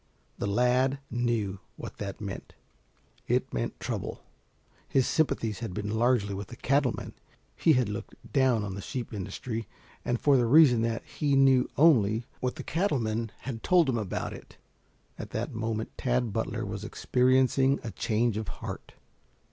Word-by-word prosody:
The - - -1
lad 125 +5 +2
knew 115 -5 -1 0.2
what - - -8
that - - -5
meant. - - -7 0.7
It - - 0
meant - - -3
trouble. - - -4 0.7
His 130 -2 +3
sympathies 115 - 0
had 110 -6 -5
been 105 -1 -3
largely 115 -3 +2
with 100 0 -5
the 120 - -10
cattle 135 +1 +2
men - - -7 0.4
he 160 - +4
had 125 -4 +2
looked 105 0 -6 0.2
down 130 -6 +3
on 100 -2 -4
the 100 - -6
sheep 125 +3 -5
industry 110 +3 -4 0.4
and 120 -1 0
for 140 -2 +4
the 120 -2 +2
reason 130 -3 +6
that 115 0 -1
he 145 -2 0
knew 135 -2 +5
only 115 -8 +4
what 125 0 -2
the - - -6
cattle 170 -1 0
men 110 -1 -2
had 120 -4 -5
told 175 +1 +4
him 120 - +1
about 105 -4 -3
it. - - -12 0.6
At - - -6
that - - -3
moment 110 0 -3
Tad 125 -4 0
Butler 115 +1 -2
was 100 +1 -5
experiencing 130 +3 +2
a 115 - -4
change 110 0 0
of 110 - -3
heart. - - -7
120 Hz, 165 wpm, -28 LUFS, 110-130 Hz, 0.7 s, reason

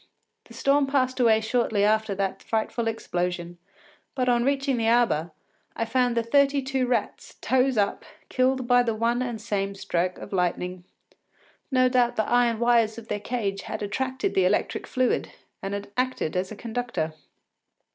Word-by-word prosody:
The - - -14
storm 280 0 +2
passed 260 -2 0
away 225 -3 +4
shortly 220 -2 +1
after 215 -1 +2
that 195 -1 -2
frightful 225 +1 -2
explosion, 175 -5 -3 0.6
but, 255 -2 0
on 240 -1 +3
reaching 275 0 +1
the 225 -1 0
arbour, 230 -9 +2 0.5
I 230 - -1
found 245 +1 +1
the 230 - +2
thirty 280 +3 +3
two 265 -1 -1
rats, 240 -4 -2
toes 260 0 +2
up, 200 -1 0 0.2
killed 255 0 +1
by 245 0 +5
the 230 -2 -1
one 235 +2 +1
and 240 -3 -3
same 200 -2 -2
stroke 180 -1 -1
of - - -9
lightning. 180 0 -1 0.8
No 255 -1 +4
doubt 250 -1 +2
the 220 - 0
iron 240 -1 +3
wires 235 -1 +2
of 230 -1 -10
their 205 - -1
cage 205 -4 -3
had 215 +2 -5
attracted 260 +6 -2
the 190 - +3
electric 195 +3 0
fluid 255 -1 0 0.3
and 200 +1 -4
acted 255 -11 -1
as 185 +2 -1
a - - -6
conductor. 230 -8 -3
230 Hz, 165 wpm, -25 LUFS, 200-255 Hz, 0.8 s, by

